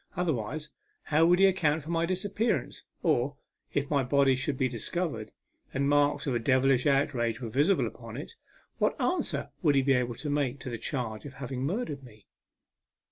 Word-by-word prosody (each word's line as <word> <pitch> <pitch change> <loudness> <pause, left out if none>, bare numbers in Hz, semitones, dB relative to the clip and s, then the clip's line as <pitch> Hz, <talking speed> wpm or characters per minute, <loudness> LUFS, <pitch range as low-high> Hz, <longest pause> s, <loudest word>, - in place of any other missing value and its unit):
Otherwise, 150 -3 -2 0.3
how 160 +2 +3
would 175 +1 +5
he 195 - +6
account 160 -5 +2
for 160 - -6
my 165 0 +1
disappearance? 190 - -1 0.2
Or, 130 +4 +2 0.4
if 145 0 -1
my 140 -2 +3
body 135 +1 +3
should 130 +1 -2
be 130 - +2
discovered, 120 - -3 0.4
and 140 +1 +1
marks 145 0 +2
of 135 - 0
a 120 - +1
devilish 130 +2 +3
outrage 125 -5 +1
were 120 -3 -5
visible 145 - +3
upon - - -8
it, - - -7 0.5
what - - +1
answer 360 - 0
would 150 -6 +3
he 135 - +4
be 135 0 +4
able 125 -2 0
to 150 - -5
make 140 -2 0
to 125 - -5
the 115 - -4
charge 120 -7 -3
of 140 - -10
having 130 -1 -5
murdered 160 - -3
me 110 -5 -16
140 Hz, 185 wpm, -29 LUFS, 125-155 Hz, 0.5 s, he